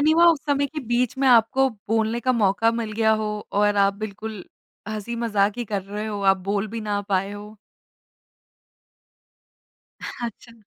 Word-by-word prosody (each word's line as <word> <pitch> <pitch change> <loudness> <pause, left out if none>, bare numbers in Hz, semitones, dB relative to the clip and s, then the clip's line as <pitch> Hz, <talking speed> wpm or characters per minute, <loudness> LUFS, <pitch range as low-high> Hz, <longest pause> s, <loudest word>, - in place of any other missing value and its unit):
नहीं 310 +2 +4
हुआ 340 +1 +5
उस 325 - +1
समय 285 -1 +1
के 300 +2 -6
बीच 240 +1 0
में 270 - +2
आपको 250 +3 +4 0.2
बोलने 225 +1 +1
का 255 +2 +1
मौका 225 -1 +2
मिल 230 -2 -3
गया 220 0 +3
हो - - -2 0.3
और 205 0 +2
आप 200 0 +3
बिल्कुल 215 -1 -7 0.4
हँसी-मज़ाक़ 215 -1 -1
ही 240 - -2
कर 205 -3 -3
रहे 205 +3 -5
हो, 205 -2 -4
आप 195 0 +5
बोल 200 +2 -2
भी 225 +1 -5
ना 205 -1 -2
पाए 195 0 0
हो? 210 +1 -10 2.4
अच्छा। 235 0 -7
220 Hz, 165 wpm, -23 LUFS, 205-235 Hz, 2.4 s, हुआ